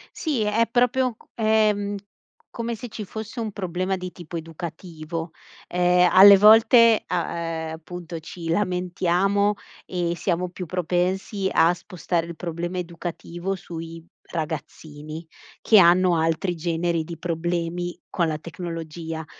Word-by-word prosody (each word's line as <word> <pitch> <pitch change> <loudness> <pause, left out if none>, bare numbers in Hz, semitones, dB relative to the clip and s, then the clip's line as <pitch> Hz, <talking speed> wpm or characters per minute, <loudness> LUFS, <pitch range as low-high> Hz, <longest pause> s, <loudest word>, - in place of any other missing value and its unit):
Sì, 300 -9 -1
è 215 +2 +2
proprio 250 +1 +2
c - - -22
è, 220 -1 +3
mhmm, 205 0 -3 0.6
come 235 0 -3
se 245 +3 -8
ci 215 -1 -7
fosse 220 +4 -7
un 220 -2 -3
problema 185 -1 -2
di 180 0 -6
tipo 175 -1 -8
educativo, 165 0 -7 0.4
ehm, 180 0 +3
alle 195 +1 +10
volte 225 +2 +7
a 175 -2 -2
ehm, 165 -1 -4
appunto 170 +1 -8
ci 165 +1 -9
lamentiamo, 185 +2 +1 0.3
e 175 -2 -1
siamo 180 0 -1
più 180 0 -7
propensi 185 +3 -1
a 165 +2 +4
spostare 175 -1 -3
il 170 - -7
problema 175 +2 -4
educativo 175 +1 -5
sui 165 -2 -8 0.3
ragazzini, 155 0 -6 0.4
che 215 - +7
hanno 180 0 +5
altri 165 +3 0
generi 170 0 -1
di 165 +1 -8
problemi 175 +1 -3
con 170 -2 +1
la 155 -1 -2
tecnologia, 165 -1 -6
175 Hz, 135 wpm, -24 LUFS, 165-195 Hz, 0.6 s, alle